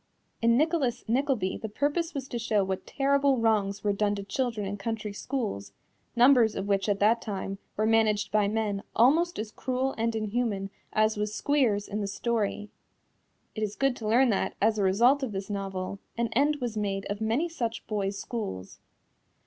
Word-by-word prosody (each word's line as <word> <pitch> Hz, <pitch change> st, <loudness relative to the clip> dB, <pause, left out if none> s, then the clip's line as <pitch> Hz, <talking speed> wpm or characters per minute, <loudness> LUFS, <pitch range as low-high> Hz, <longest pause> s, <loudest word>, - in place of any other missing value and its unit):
In 230 Hz, +1 st, +4 dB
Nicholas 305 Hz, -5 st, +1 dB
Nickleby 245 Hz, -5 st, 0 dB
the 220 Hz, -, -5 dB
purpose 295 Hz, -, -1 dB
was 270 Hz, -1 st, -4 dB
to 240 Hz, -, -3 dB
show 215 Hz, -3 st, +1 dB
what 190 Hz, 0 st, -4 dB
terrible 280 Hz, 0 st, +2 dB
wrongs 205 Hz, -3 st, +1 dB
were 205 Hz, -1 st, +2 dB
done 205 Hz, 0 st, +1 dB
to 200 Hz, -, -5 dB
children 225 Hz, +1 st, -2 dB
in 200 Hz, +1 st, -3 dB
country 210 Hz, 0 st, -4 dB
schools, 200 Hz, -, -4 dB, 0.4 s
numbers 245 Hz, -2 st, +5 dB
of 195 Hz, -, -3 dB
which 200 Hz, +1 st, +1 dB
at 200 Hz, -, +2 dB
that 225 Hz, +3 st, +4 dB
time 195 Hz, -1 st, -4 dB, 0.2 s
were 215 Hz, -, +2 dB
managed 215 Hz, -2 st, +2 dB
by 210 Hz, -1 st, +3 dB
men 210 Hz, -2 st, -1 dB
almost 320 Hz, +9 st, +4 dB
as 215 Hz, 0 st, -4 dB
cruel 260 Hz, +3 st, -2 dB
and 230 Hz, 0 st, 0 dB
inhuman 215 Hz, -2 st, -1 dB, 0.2 s
as 215 Hz, 0 st, +2 dB
was 210 Hz, 0 st, -2 dB
Squeers 245 Hz, -9 st, +1 dB
in 210 Hz, +1 st, -3 dB
the 200 Hz, -, -2 dB
story. 210 Hz, -1 st, -2 dB, 0.8 s
It 220 Hz, -, -5 dB
is 210 Hz, -1 st, -2 dB
good 275 Hz, -2 st, +1 dB
to 220 Hz, -, -5 dB
learn 245 Hz, +4 st, +4 dB
that, 195 Hz, -, -1 dB
as 215 Hz, +1 st, +2 dB
a -, -, +2 dB
result 240 Hz, +9 st, +4 dB
of 255 Hz, -6 st, -3 dB
this 195 Hz, +1 st, -4 dB
novel, 195 Hz, -1 st, -4 dB, 0.2 s
an 235 Hz, -1 st, 0 dB
end 290 Hz, +5 st, +3 dB
was 245 Hz, -6 st, -4 dB
made 200 Hz, -2 st, -2 dB
of 205 Hz, +1 st, -4 dB
many 230 Hz, +10 st, +1 dB
such 235 Hz, -9 st, -4 dB
boys' 200 Hz, -2 st, -2 dB
schools. 195 Hz, -, -5 dB
220 Hz, 185 wpm, -28 LUFS, 200-245 Hz, 0.8 s, numbers